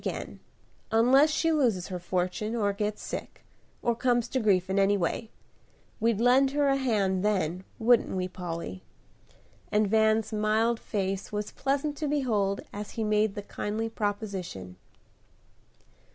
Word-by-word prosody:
again, -, -, -5 dB, 0.5 s
unless 255 Hz, +7 st, +5 dB
she 325 Hz, +2 st, +1 dB
loses 235 Hz, -, +1 dB
her 180 Hz, -1 st, -4 dB
fortune, 185 Hz, +5 st, -2 dB
or 205 Hz, -3 st, +1 dB
gets 210 Hz, +1 st, -3 dB
sick, -, -, -6 dB, 0.4 s
or 235 Hz, -1 st, +2 dB
comes 240 Hz, 0 st, +1 dB
to 260 Hz, -, -1 dB
grief 195 Hz, -5 st, +2 dB
in 190 Hz, +1 st, +1 dB
any 200 Hz, +1 st, +4 dB
way. 200 Hz, +5 st, -2 dB, 0.7 s
We'd 225 Hz, -2 st, +1 dB
lend 255 Hz, +3 st, +5 dB
her 285 Hz, -1 st, +3 dB
a 275 Hz, -, +3 dB
hand 205 Hz, -8 st, +1 dB
then, 185 Hz, -3 st, 0 dB
wouldn't 235 Hz, +1 st, +4 dB
we, 185 Hz, -1 st, -2 dB
Polly?" 170 Hz, -, -6 dB, 0.9 s
and 210 Hz, 0 st, +3 dB
Van's 220 Hz, +1 st, +2 dB
mild 220 Hz, +2 st, +1 dB
face 195 Hz, -2 st, -3 dB
was 210 Hz, 0 st, -3 dB
pleasant 280 Hz, +2 st, -1 dB
to 305 Hz, -, -2 dB
behold 220 Hz, -9 st, 0 dB
as 205 Hz, 0 st, -6 dB
he 225 Hz, -, 0 dB
made 210 Hz, -1 st, +1 dB
the 205 Hz, -, -5 dB
kindly 215 Hz, +3 st, -3 dB
proposition. 200 Hz, -, -4 dB
215 Hz, 145 wpm, -28 LUFS, 195-235 Hz, 0.9 s, unless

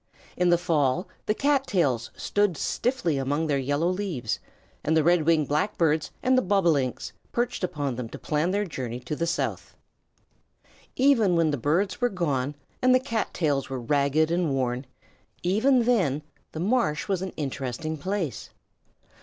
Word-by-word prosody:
In 180 Hz, 0 st, +2 dB
the 175 Hz, -, +5 dB
fall 165 Hz, -2 st, +1 dB, 0.2 s
the 210 Hz, -, +2 dB
cat 275 Hz, 0 st, +2 dB
tails 140 Hz, -, +1 dB
stood 205 Hz, -5 st, +1 dB
stiffly 235 Hz, -, 0 dB
among 145 Hz, +4 st, 0 dB
their 145 Hz, -3 st, +1 dB
yellow 145 Hz, +5 st, 0 dB
leaves, 180 Hz, -, -2 dB, 0.4 s
and 160 Hz, +2 st, +2 dB
the 160 Hz, -, +4 dB
Red 170 Hz, -1 st, +3 dB
winged 160 Hz, -4 st, +3 dB
Blackbirds 155 Hz, -1 st, +1 dB
and 255 Hz, +1 st, +4 dB
the 255 Hz, -, +4 dB
Bobolinks 170 Hz, -, +1 dB, 0.2 s
perched 240 Hz, -4 st, -1 dB
upon 145 Hz, -7 st, -2 dB
them 120 Hz, -3 st, -4 dB
to -, -, -8 dB
plan 155 Hz, +3 st, 0 dB
their 205 Hz, +2 st, 0 dB
journey 125 Hz, -, -5 dB
to 125 Hz, +5 st, -4 dB
the 170 Hz, +2 st, -1 dB
south. 170 Hz, -, -2 dB, 1.2 s
Even 240 Hz, -9 st, +4 dB
when 165 Hz, -2 st, +3 dB
the -, -, +1 dB
birds 165 Hz, -, 0 dB
were 245 Hz, -, +3 dB
gone 145 Hz, -, -1 dB, 0.3 s
and 255 Hz, 0 st, +5 dB
the -, -, +5 dB
cat 230 Hz, -4 st, -2 dB
tails 145 Hz, -5 st, 0 dB
were 135 Hz, -1 st, -3 dB
ragged 145 Hz, +5 st, +2 dB
and 170 Hz, -1 st, +1 dB
worn 130 Hz, 0 st, -1 dB, 0.6 s
even 235 Hz, +8 st, +3 dB
then, 180 Hz, -, +1 dB, 0.3 s
the 155 Hz, -, -5 dB
marsh 195 Hz, -5 st, +1 dB
was 190 Hz, -3 st, 0 dB
an 190 Hz, -1 st, -4 dB
interesting 140 Hz, +2 st, -3 dB
place. 180 Hz, -, -3 dB
165 Hz, 160 wpm, -26 LUFS, 145-200 Hz, 1.2 s, the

